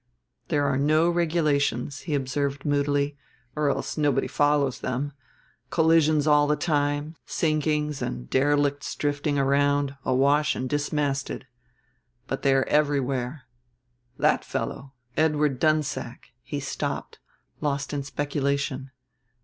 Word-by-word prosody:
"There 145 -1 +1
are 135 -1 +1
no 155 +4 +3
regulations," 150 -6 +1
he 150 - +1
observed 140 +1 -2
moodily; 145 0 +1 0.4
"or 150 -1 +1
else 140 - -2
nobody 145 -2 +2
follows 145 -3 +1
them: 135 +3 -3 0.6
collisions 160 -2 +3
all 150 -1 +5
the 150 - +3
time, 145 0 -1
sinkings 150 -2 0
and - - -4
derelicts 145 - +1
drifting 145 0 -1
round, 140 0 +2
awash 140 +4 +3
and 130 - -3
dismasted. 145 -1 -1 0.8
But 135 - -4
they 135 -1 +3
are 135 - +3
everywhere. 140 -2 0 0.7
That - - +2
fellow, 135 0 -4 0.2
Edward 150 -4 +2
Dunsack 155 -1 -1
" - - -48
he - - -5
stopped, - - -4 0.4
lost 140 -1 -2
in 145 - -1
speculation. 140 -1 -2
145 Hz, 115 wpm, -26 LUFS, 140-150 Hz, 0.8 s, all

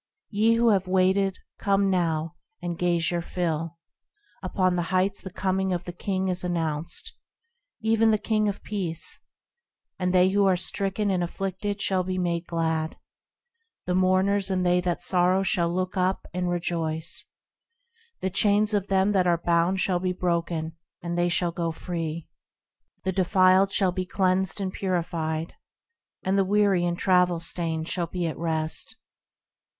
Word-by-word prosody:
Ye 220 +2 +3
who 235 0 +4
have 190 -3 +2
waited, 190 +1 +2 0.2
come 195 -1 +2
now, 165 -3 0 0.3
and 175 -1 -4
gaze 170 -1 +1
your 175 -1 -1
fill: 165 -2 -3 0.6
Upon 185 -2 +1
the 175 - +1
Heights 190 +1 +1
the 190 - -7
coming 190 +1 -1
of 175 0 -2
the 175 - -7
King 190 +1 -2
is 180 -1 -1
announced, 165 -2 -2 0.7
Even 225 0 +3
the 215 - +4
King 215 0 +1
of 200 - -6
Peace; 180 -6 -2 0.8
And 180 -1 +1
they 185 0 +5
who 200 +1 +2
are 185 -1 +3
stricken 195 +2 -1
and 180 -2 +1
afflicted 195 +3 -3
shall 190 -1 +2
be 185 +1 -3
made 175 -1 -1
glad; 160 -1 -1 0.9
The 180 - -1
mourners 185 +2 +2
and 185 -1 0
they 180 0 +3
that 175 -1 -2
sorrow 185 +1 +3
shall 170 -3 +1
look 185 +1 -2
up, 185 0 0
and 180 0 -1
rejoice: 165 -2 -2 1.0
The 190 - -1
chains 210 +2 +3
of 200 -1 0
them 195 +1 +2
that 185 -3 +2
are 170 -1 +3
bound 170 +2 +1
shall 180 -2 +1
be 185 0 -1
broken, 170 -2 -2 0.3
and 170 0 -3
they 175 0 +2
shall 175 0 +1
go 170 -1 -2
free; 165 -1 -4 0.8
The 190 - 0
defiled 185 +1 +4
shall 190 -2 +3
be 185 0 -3
cleansed 185 -1 +1
and 190 -1 -3
purified, 165 -3 -2 0.7
And 190 +1 +1
the - - +4
weary 200 -2 +2
and 175 0 -1
travel 180 -2 +3
stained 165 -1 -2
shall 175 -1 -1
be 175 +1 -3
at 160 - -3
rest. 160 -1 -2
180 Hz, 160 wpm, -26 LUFS, 170-190 Hz, 1.0 s, they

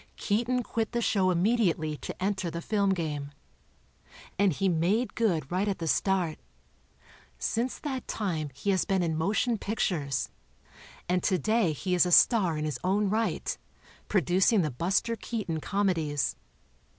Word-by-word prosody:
Keaton 240 +4 0
quit 225 -1 -2
the 240 - +1
show' 195 -5 +2
immediately 175 -5 +1
to - - -7
enter 190 -3 -1
the 170 +1 -5
film 200 +2 0
game. 150 -6 -2 1.1
And 200 -2 +4
he 195 +6 0
made 185 +8 +1
good 170 -11 0
right 185 +3 0
at 200 - -1
the 165 - -4
start. 180 -1 +1 1.0
Since 240 +3 -1
that 265 -4 -5
time 165 -8 -2
he 170 +9 -1
has 190 - +2
been 190 -2 +1
in 160 -2 0
motion 210 +7 0
pictures, 150 - -1 0.8
and 180 0 +1
today 195 - +2
he 180 +5 -3
is 180 0 +4
a - - -1
star 185 -5 +5
in 150 - -2
his 145 -5 -3
own 195 +2 +1
right, 225 +1 -1 0.5
producing 190 - +3
the 155 - -1
Buster 190 - 0
Keaton 210 -7 -3
Comedies. 165 -7 0
190 Hz, 150 wpm, -28 LUFS, 165-215 Hz, 1.1 s, star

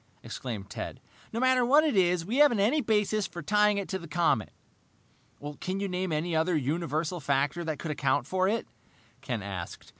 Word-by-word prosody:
exclaimed 110 -6 -6
Ted. - - -6 0.3
"No 230 - -3
matter 255 0 +4
what 285 +6 +5
it 305 -7 +1
is, 180 -3 +2
we 230 +8 -2
haven't 290 -7 +5
any 245 +10 +3
basis 210 -3 +1
for 175 -3 -8
tying 210 +3 +3
it 200 - -3
to 190 - -2
the 170 - -10
comet." 160 -9 +1 1.1
"Can 185 +1 -3
you 200 - -1
name 185 -1 -2
any 160 +2 -1
other 160 +2 +2
universal 160 +3 -1
factor 140 +3 0
that 160 -2 -3
could 155 - -4
account 145 -2 0
for 185 +5 +1
it?" 225 +3 0 0.6
Ken 120 -5 -3
asked. 95 -4 -7
175 Hz, 185 wpm, -28 LUFS, 150-210 Hz, 1.1 s, what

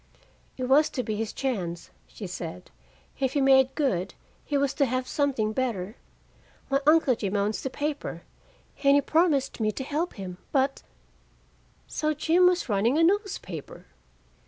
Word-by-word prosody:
"It 255 - -4
was 275 +4 +4
to 250 - -3
be 215 -2 -3
his 220 0 -3
chance," 180 -11 -3 0.2
she 210 - -9
said. 175 -1 -7 0.5
"If 265 -2 0
he 285 - +1
made 265 -1 +5
good, 195 - -1 0.3
he 290 - -1
was 280 -1 +1
to 285 - +2
have 255 +1 -2
something 260 -8 0
better. 220 -5 -2 0.8
My 275 0 +2
Uncle 310 -4 +5
Jim 205 -3 -3
owns 205 +1 0
the 265 - -3
paper, 290 +2 -4 0.6
and 280 0 +6
he 285 - +5
promised 305 -5 +1
me 215 -1 +1
to 265 - -4
help 305 +6 -2
him. 185 -3 -8
But 270 0 +1 0.6
" - - -35 0.3
So 305 0 -1
Jim 335 +4 +4
was 360 -4 +1
running 225 +5 +2
a 330 - +4
newspaper! 405 +6 -2
265 Hz, 160 wpm, -27 LUFS, 215-295 Hz, 0.8 s, and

